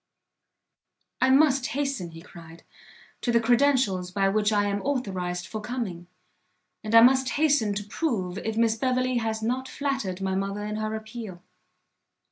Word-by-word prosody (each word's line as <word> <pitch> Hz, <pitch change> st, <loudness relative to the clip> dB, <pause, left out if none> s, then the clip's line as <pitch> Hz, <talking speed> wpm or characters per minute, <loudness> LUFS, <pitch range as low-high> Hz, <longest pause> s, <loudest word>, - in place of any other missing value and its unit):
"I 260 Hz, -, +4 dB
must 270 Hz, -1 st, +4 dB
hasten," 275 Hz, -11 st, -2 dB
he 165 Hz, 0 st, -12 dB
cried, 165 Hz, -2 st, -13 dB, 0.6 s
"to 240 Hz, -, 0 dB
the 235 Hz, -, +4 dB
credentials 235 Hz, -6 st, +2 dB
by 195 Hz, +1 st, +1 dB
which 210 Hz, +1 st, +1 dB
I 205 Hz, -1 st, +2 dB
am 200 Hz, 0 st, -1 dB
authorised 185 Hz, -10 st, -2 dB
for 215 Hz, +2 st, -6 dB
coming, 210 Hz, -7 st, -5 dB, 0.8 s
and 215 Hz, +1 st, -1 dB
I 230 Hz, -, +10 dB
must 260 Hz, +2 st, +5 dB
hasten 285 Hz, -9 st, +2 dB
to 205 Hz, -, -3 dB
prove 205 Hz, -, -2 dB
if 220 Hz, 0 st, -4 dB
Miss 225 Hz, -1 st, +3 dB
Beverley 255 Hz, +1 st, 0 dB
has 220 Hz, -1 st, -2 dB
not 255 Hz, +3 st, -1 dB
flattered 265 Hz, -12 st, -3 dB
my 190 Hz, -1 st, -2 dB
mother 195 Hz, +2 st, -2 dB
in 210 Hz, 0 st, -4 dB
her 215 Hz, 0 st, -2 dB
appeal." 220 Hz, -5 st, -8 dB
220 Hz, 155 wpm, -26 LUFS, 195-255 Hz, 0.8 s, I